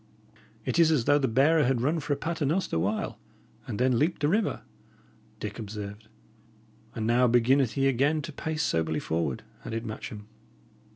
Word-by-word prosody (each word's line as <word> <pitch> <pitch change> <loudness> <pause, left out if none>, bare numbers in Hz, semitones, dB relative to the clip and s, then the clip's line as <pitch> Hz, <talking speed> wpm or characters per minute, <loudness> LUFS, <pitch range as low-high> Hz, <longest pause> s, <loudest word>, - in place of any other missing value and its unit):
"It - - 0
is 165 -2 +6
as 145 -8 +2
though 145 0 +4
the 135 - +1
bearer 145 +7 +4
had 130 -2 +1
run 155 +6 +1
for 145 -1 -5
a - - +3
pater 165 +2 -3
noster 150 - 0
while, 100 +6 -2 0.5
and - - -4
then 125 -1 +2
leaped 160 +3 0
the 145 - +3
river," 210 +4 0 0.8
Dick 105 +2 -5
observed. 105 0 -7 0.9
"And 110 - -2
now 120 +2 +4
beginneth 120 +1 +3
he 135 -1 +2
again 140 +4 +2
to - - -7
pace 160 -1 -2
soberly 80 -1 0
forward," 80 -6 -2 0.2
added 115 +1 -4
Matcham. 105 -1 -7
130 Hz, 170 wpm, -28 LUFS, 110-150 Hz, 0.9 s, is